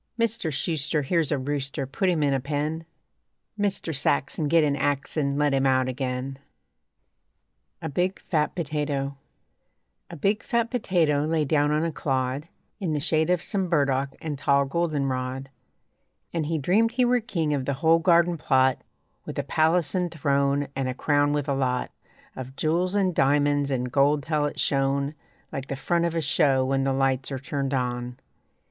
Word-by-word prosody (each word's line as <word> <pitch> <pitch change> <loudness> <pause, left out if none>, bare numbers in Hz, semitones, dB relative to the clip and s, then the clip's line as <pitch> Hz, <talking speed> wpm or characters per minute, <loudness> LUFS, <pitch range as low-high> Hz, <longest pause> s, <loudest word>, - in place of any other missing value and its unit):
Mister 230 -7 0
Shuster, 150 +1 0
Here's 165 +2 0
a 145 - +2
rooster, 140 +1 -3
Put 185 +8 -1
him 165 -4 +1
in 140 -1 +2
a 135 - +1
pen. 150 +4 -3 0.7
Mister 200 -5 -1
Saxon, 140 +2 0
Get 165 +1 +4
an 145 -2 +1
ax 145 0 -1
an' 140 -2 0
Let 145 -1 +2
him 135 0 +2
out 130 -1 +2
again. 130 +1 -3 1.4
A - - -2
BIG, 180 +6 -1
FAT 150 -3 -1
POTATO 145 -4 -2 0.9
A - - -8
big, 200 +7 0
fat 235 0 -1
potato 165 - +1
lay 160 -1 +1
down 145 0 +2
on 155 +1 +1
a 165 - -1
clod 135 0 -2 0.3
In 175 -5 -1
the 150 - 0
shade 155 +2 +2
of 180 -2 +2
some 190 -4 -1
burdock 140 -4 +1
and 150 -4 -5
tall 140 0 +3
goldenrod, 135 -4 -2 0.8
And 160 -3 -1
he 165 0 0
dreamed 210 - +2
he 250 0 +3
were 245 0 +3
king 170 -10 -1
of 135 -3 -1
the 140 - -1
whole 160 +3 +4
garden 170 -1 +3
plot, 130 -1 +2 0.4
With - - -7
a - - 0
palace 160 -1 +2
and 180 -1 0
throne, 140 -2 +1
and 135 -1 -1
a 130 - -3
crown 145 +1 +2
with 145 -1 -1
a 140 - +1
lot 130 -2 -1 0.4
Of 130 0 -8
jewels 175 +6 0
and 190 -3 +2
diamonds 145 0 +2
and 125 -2 -2
gold 145 +2 +3
till 155 -1 0
it - - -6
shone 140 +1 +1 0.4
Like 135 0 -5
the 140 - -3
front 170 +6 0
of 170 -1 -2
a 165 - +1
show 135 -2 +2
when 135 0 0
the 135 - +1
lights 135 0 0
are 135 - -2
turned 135 0 -2
on. 125 -1 -3
145 Hz, 180 wpm, -25 LUFS, 135-165 Hz, 1.4 s, Get